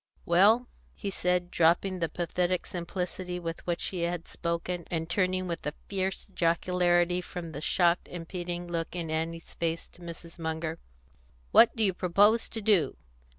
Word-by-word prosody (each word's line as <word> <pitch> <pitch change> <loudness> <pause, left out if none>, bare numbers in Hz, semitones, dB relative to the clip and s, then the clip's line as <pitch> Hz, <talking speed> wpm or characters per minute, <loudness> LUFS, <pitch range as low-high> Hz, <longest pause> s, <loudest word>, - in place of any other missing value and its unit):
Well," 210 +8 +5 0.3
he 200 - -4
said, 180 -1 0
dropping 175 +3 +3
the 165 -2 0
pathetic 175 +2 -1
simplicity 180 0 -4
with 165 -1 -5
which 170 -1 -1
he 185 - -4
had 170 0 -2
spoken, 170 0 -3
and 165 -1 -2
turning 185 +1 +1
with 170 -1 -4
a 150 - -3
fierce 190 -1 -2
jocularity 175 0 +2
from 175 -2 -7
the 145 - -6
shocked 175 +1 +2
and 170 -2 -7
pitying 175 -1 -4
look 165 0 -3
in 165 -3 -3
Annie's 165 +1 -3
face 165 0 -2
to 175 - -18
Mrs. 170 0 -9
Munger, 160 0 -3 0.7
"what 235 - +7
do 225 - +2
you 195 -3 +4
propose 205 +6 +3
to 225 - -5
do? 200 -10 +3
175 Hz, 160 wpm, -29 LUFS, 165-185 Hz, 0.7 s, what